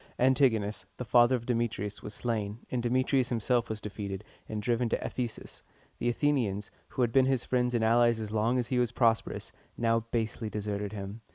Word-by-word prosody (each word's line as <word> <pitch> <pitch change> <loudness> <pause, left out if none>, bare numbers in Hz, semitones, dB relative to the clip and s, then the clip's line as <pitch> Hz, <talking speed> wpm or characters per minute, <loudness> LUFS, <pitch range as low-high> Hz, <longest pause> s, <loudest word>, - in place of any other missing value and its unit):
Antigonus, 115 -7 +2
the 125 - -4
father 120 +1 +5
of 120 -2 -4
Demetrius, 115 -4 -1
was 105 - -7
slain, 110 -3 -2
and 125 - 0
Demetrius 130 +1 +2
himself 120 0 +1
was 110 -1 -3
defeated, 100 -1 -5 0.3
and 110 - -3
driven 120 +2 0
to - - -1
Ephesus. 120 -3 -5 0.4
The - - +1
Athenians, 115 -7 0 0.2
who 130 - -1
had 120 - +1
been 130 +1 +4
his 130 -3 +1
friends 125 -1 +1
and 115 - +2
allies 120 0 +4
as 110 -1 -5
long 110 +3 +2
as 120 -2 -1
he 125 - +1
was 120 -2 +1
prosperous, 115 -2 +1 0.3
now 115 -1 +2
basely 110 -1 -2
deserted 105 -1 -3
him. 100 +1 -6
115 Hz, 185 wpm, -30 LUFS, 105-125 Hz, 0.4 s, father